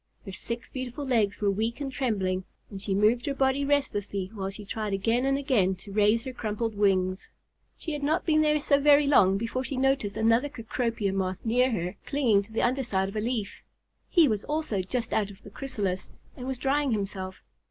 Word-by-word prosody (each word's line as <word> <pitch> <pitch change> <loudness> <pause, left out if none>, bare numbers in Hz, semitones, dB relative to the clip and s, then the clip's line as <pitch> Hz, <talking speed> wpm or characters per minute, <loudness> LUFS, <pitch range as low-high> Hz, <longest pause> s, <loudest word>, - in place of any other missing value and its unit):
Her 195 - -6
six 235 +5 -5
beautiful 255 +2 -5
legs 220 -7 +1
were 205 -1 +3
weak 225 +5 -2
and 280 -2 -3
trembling, 195 -8 -1 0.3
and 195 -1 -7
she 195 -1 -1
moved 220 +6 +3
her 280 - -1
body 270 +1 +2
restlessly 205 -9 -1
while 195 -3 -3
she 200 +1 -9
tried 215 0 -3
again 225 +6 +1
and 275 0 +2
again 235 -10 +2
to 200 +3 -13
raise 210 +3 +3
her 260 - -6
crumpled 225 -1 -2
wings. 190 -2 +1 0.5
She 320 - -5
had 295 - -4
not 310 +4 0
been 310 -2 +4
there 300 0 +3
so 280 -1 +3
very 290 0 +6
long 195 -9 +5
before 230 +4 -2
she 265 0 -4
noticed 270 -6 +1
another 230 +5 +3
Cecropia 230 -5 -2
Moth 185 0 -2
near 250 +3 +3
her, 180 -4 -3
clinging 245 -8 +3
to 200 +2 -13
the 225 - 0
under 255 +3 +2
side 195 -6 0
of 200 - -10
a 215 - 0
leaf. 225 -3 -3 0.5
He 335 -5 +5
was 215 -4 -1
also 295 -10 -1
just 230 +6 -3
out 205 -2 +1
of 200 +1 -14
the - - -12
chrysalis 200 -9 -3 0.3
and 250 -1 -7
was 265 -1 -2
drying 275 0 +1
himself. 190 -2 -4
225 Hz, 205 wpm, -27 LUFS, 200-270 Hz, 0.5 s, very